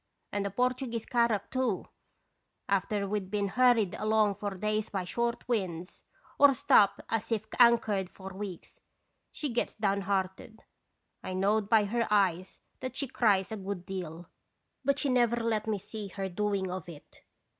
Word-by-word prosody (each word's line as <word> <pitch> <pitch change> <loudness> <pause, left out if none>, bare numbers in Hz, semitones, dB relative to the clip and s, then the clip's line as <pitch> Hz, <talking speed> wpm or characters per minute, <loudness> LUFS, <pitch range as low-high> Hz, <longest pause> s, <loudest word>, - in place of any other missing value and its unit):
And 205 - -1
the 200 - -1
Portuguese 245 +1 -1
carrack, 235 -4 +1
too! 255 -7 0 0.8
After 200 +1 0
we 210 +2 0
'd 190 -2 -10
been 200 -1 -1
hurried 235 -4 +3
along 215 -1 +2
for 205 +1 -4
days 215 +2 -1
by 195 -2 -2
short 235 +5 -2
winds, 185 -7 -3 0.3
or 280 -1 +7
stopped 200 -4 +4
as 225 +1 -2
if 220 -1 0
anchored 220 -6 +4
for 190 0 -9
weeks, 195 -2 -8 0.5
she 295 - -3
gets 240 - -1
downhearted. 200 +1 -2 0.6
I 185 - -5
knowed 205 +2 +1
by 220 -2 +5
her 230 +3 0
eyes 190 -3 +1 0.2
that 255 -1 -5
she 275 - -2
cries 205 -6 +2
a 220 - -3
good 195 -2 -5
deal, 175 -3 -6 0.6
but 280 +1 +2
she 285 - -1
never 240 -3 +3
let 225 -2 -1
me 215 -2 0
see 210 +2 -7
her 195 0 -4
doing 195 0 -1
of 180 -2 -6
it. 155 -4 -13
210 Hz, 160 wpm, -30 LUFS, 190-230 Hz, 0.8 s, or